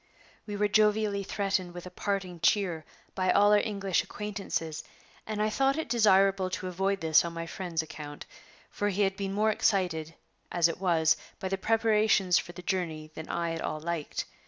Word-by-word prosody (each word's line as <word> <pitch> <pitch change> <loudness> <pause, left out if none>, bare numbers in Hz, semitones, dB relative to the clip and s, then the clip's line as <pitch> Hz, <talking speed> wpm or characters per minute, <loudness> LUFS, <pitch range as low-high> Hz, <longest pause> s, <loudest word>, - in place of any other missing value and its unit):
We 205 - -4
were 210 0 +2
jovially 210 -1 +2
threatened 190 -3 -2
with 175 - -7
"a 180 - -8
parting 185 -2 -3
cheer" 170 -2 +1 0.3
by 185 -1 0
all 205 +2 +5
our 210 - +6
English 200 -4 0
acquaintances, 195 -7 -4 0.4
and 215 -1 -3
I 215 0 +1
thought 270 +5 +2
it 320 - -2
desirable 195 -4 +4
to 185 0 -4
avoid 195 +2 -1
this 160 -1 +5
on 170 0 -5
my 165 0 -4
friend's 165 -2 -3
account; 150 -2 -9 0.5
for 205 - -1
he 205 +1 +1
had 195 -1 +1
been 195 0 -3
more 215 +2 +2
excited, 175 -7 0 0.4
as 170 -1 +4
it 170 +2 -5
was, 165 -3 +3 0.2
by 190 - -3
the 195 - -1
preparations 215 -4 +3
for - - -7
the 180 +1 -11
journey 165 -5 -3
than 160 0 -8
I 170 -1 -1
at 165 - -4
all 155 - -3
liked. 165 -1 -3
190 Hz, 185 wpm, -29 LUFS, 170-205 Hz, 0.5 s, our